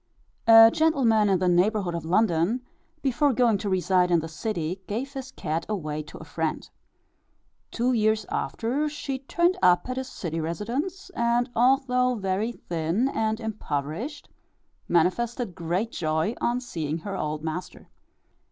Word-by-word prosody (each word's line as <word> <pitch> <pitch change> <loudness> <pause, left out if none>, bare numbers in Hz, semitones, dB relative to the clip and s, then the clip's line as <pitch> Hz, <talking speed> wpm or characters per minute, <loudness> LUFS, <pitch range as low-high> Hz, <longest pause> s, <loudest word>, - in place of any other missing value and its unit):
A 225 0 +9
gentleman 245 -10 +3
in 190 - +3
the 180 0 0
neighbourhood 180 +1 +2
of 170 -2 -4
London, 185 +4 +2 0.4
before 275 +1 +2
going 230 -4 +3
to 205 - -3
reside 185 -1 +2
in 170 -1 +4
the 160 - -5
city 170 +1 -3
gave 255 +7 -4
his 270 -1 -6
cat 160 - -3
away 155 -7 -3
to 155 - -11
a - - -10
friend. 160 0 -3 1.0
Two 245 +2 0
years 215 -1 +2
after 275 +7 -1
she 280 -2 -4
turned 345 +7 +1
up 180 +1 +4
at 255 0 -4
his 260 0 -4
city 165 -2 -4
residence; 245 - -3
and 240 -3 +1
although 250 0 +3
very 200 +2 -1
thin 170 +8 -1
and 220 -3 -1
impoverished, 215 - -4 0.6
manifested 225 +6 +1
great 180 +6 -2
joy 160 +5 -1
on 240 +1 +1
seeing 160 - -3
her 195 +4 -6
old 150 -3 -3
master. 160 +3 -6
215 Hz, 145 wpm, -26 LUFS, 170-250 Hz, 1.0 s, A